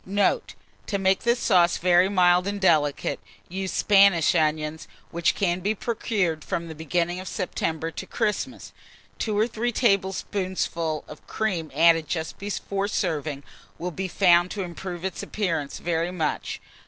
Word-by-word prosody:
Note. 200 +1 0 0.3
To 200 - -1
make 190 0 +2
this 235 +1 +2
sauce 180 -6 +3
very 180 +1 +4
mild 180 -1 +4
and 205 0 -2
delicate, 155 -6 +2 0.3
use 190 +1 -4
Spanish 195 -5 +5
onions, 155 0 0 0.2
which 170 0 +1
can 180 -3 0
be 205 +4 -1
procured 195 -8 -1
from 170 0 -3
the 160 - -7
beginning 170 +3 -1
of 185 - -7
September 165 -3 -2
to - - -7
Christmas. 225 +3 -3 0.5
2 215 -2 -1
or 215 +2 +3
3 240 +1 -2
tablespoonfuls 190 -6 0
of 150 - -12
cream 180 -8 -2
added 165 -1 +5
just 160 +1 -4
before 200 0 -3
serving, 155 -7 -2 0.3
will 180 +1 -4
be 190 +3 -3
found 175 -1 +4
to 200 0 -3
improve 175 0 -6
its 190 - -3
appearance 165 -9 -2
very 170 0 -1
much. 165 -4 -2
180 Hz, 150 wpm, -25 LUFS, 165-200 Hz, 0.5 s, Spanish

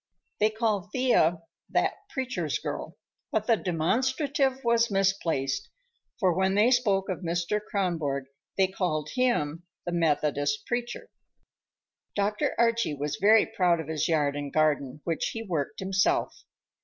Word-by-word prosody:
They 215 - +4
called 215 -3 -1
Thea 175 -11 +2 0.3
"that - - +1 0.2
preacher's 250 - -2
girl," 155 +4 -6 0.3
but 215 -1 0
the 230 - +4
demonstrative 260 - 0
was 235 0 +3
misplaced, 190 -9 0 0.5
for 185 -3 +3
when 190 +2 +1
they 215 +5 +4
spoke 205 -6 +2
of 185 - -3
Mr. 175 +3 -1
Kronborg 165 -10 -1 0.3
they 190 - +5
called 175 -5 -2
him 205 -12 +1 0.2
"the 175 - -2
Methodist 145 -3 0
preacher." 240 0 -4 1.0
Dr. 205 +1 0
Archie 230 -8 +2
was 145 +1 -3
very 215 +3 +5
proud 180 -6 +1
of 160 -1 -6
his 155 -2 0
yard 150 -3 +1
and 145 -1 -4
garden, 150 -2 +1
which 165 -2 -2
he 225 - -4
worked 165 -9 -3
himself. 190 0 0
190 Hz, 135 wpm, -27 LUFS, 155-225 Hz, 1.0 s, they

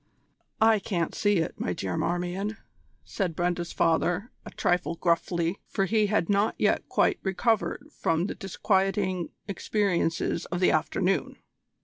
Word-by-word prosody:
"I 220 -1 +5
can't 180 -4 -2
see 205 -1 +2
it, 165 - -2
my 90 - -1
dear 90 0 -3
Marmion," 180 +5 -2 0.5
said 180 -6 -3
Brenda's 175 0 -1
father 175 +6 +1
a - - -8
trifle 175 -1 0
gruffly, 170 +1 0
for 195 - 0
he 215 +2 +2
had 200 -5 +1
not 205 +2 +2
yet - - +1
quite - - +2
recovered 225 +7 0
from 165 - 0
the - - -3
disquieting 190 -1 0 0.2
experiences 185 -4 0
of 175 - -3
the 180 - +4
afternoon. 185 +4 0
185 Hz, 135 wpm, -27 LUFS, 170-205 Hz, 0.5 s, I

